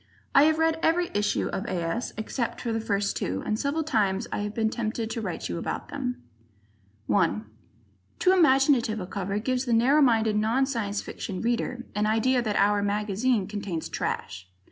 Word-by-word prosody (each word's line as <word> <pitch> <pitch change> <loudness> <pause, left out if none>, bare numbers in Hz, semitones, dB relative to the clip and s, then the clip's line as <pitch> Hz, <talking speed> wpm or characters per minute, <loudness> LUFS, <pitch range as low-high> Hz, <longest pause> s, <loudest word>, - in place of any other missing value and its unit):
I 280 - +7
have 315 0 +3
read 320 0 +2
every 345 +2 +2
issue 205 0 0
of 195 - -3
A. - - -3
S. 170 +6 -2
except 225 +2 -3
the 225 -2 -1
first 200 -2 -1
two, 95 +2 -2
and 215 - -1
several 290 +3 0
times 215 -6 0
I - - -2
have 210 +1 -4
been 220 -1 +1
tempted 225 -1 -3
to 230 - -3
write 185 -5 -4
to - - -4
you 85 - -3
about - - -4
them. 125 0 -4 0.8
1 165 - +1 0.7
Too 370 - +4
imaginative 270 - +4
a 185 - -4
cover 195 +1 -3
gives 255 +4 -1
the 240 - 0
narrow 260 +7 +4
minded 225 -5 +3
non 225 +5 +2
Science 210 -6 -2
Fiction 185 -2 -6
reader 240 +1 -1
an 210 +1 0
idea 245 +4 +2
that 215 -3 -2
"our" 205 +1 +3
mag 205 +1 -1 0.4
contains 200 -6 -4
trash. 90 0 -4
220 Hz, 185 wpm, -26 LUFS, 200-255 Hz, 0.8 s, I